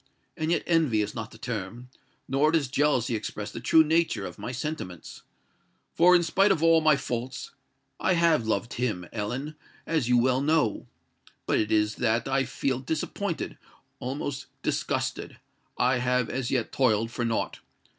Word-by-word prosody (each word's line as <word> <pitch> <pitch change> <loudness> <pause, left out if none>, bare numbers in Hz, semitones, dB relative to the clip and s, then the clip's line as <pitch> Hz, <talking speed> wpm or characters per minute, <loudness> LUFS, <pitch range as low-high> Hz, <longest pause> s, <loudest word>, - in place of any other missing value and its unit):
And 155 0 -2
yet 170 - +1
envy 155 -11 +2
is 105 - -5
not 115 -1 -5
the - - -14
term—nor 125 +6 -3
does 150 -6 +1
jealousy 130 -3 +1
express 105 -1 -4
the - - -6
true 160 +7 +5
nature, 165 +2 +1
of - - -8
my 105 +4 -4
sentiments. 125 - -6 0.7
For, 180 +2 +6
in 175 - +4
spite 195 +5 +3
of 165 -4 +1
all 165 -1 +6
my 155 -2 +5
faults, 125 -1 -4 0.5
I 185 - +2
have 165 -8 +3
loved 110 +2 -1
him, 110 -8 -2
Ellen—as 135 +4 -4
you 125 - +5
well 130 +2 +3
know. 150 -7 +1 0.6
But - - +2
it 105 - -1
is 105 0 +2
that 115 0 +1
I 135 0 +1
feel 130 -2 -2
disappointed—almost 135 -1 -5 0.2
disgusted:—I 125 +1 -2
have 125 -1 +1
as 130 -2 -2
yet 125 -4 -1
toiled 115 -3 +2
for 120 - -3
naught! 115 -1 -1
125 Hz, 150 wpm, -27 LUFS, 115-155 Hz, 0.7 s, For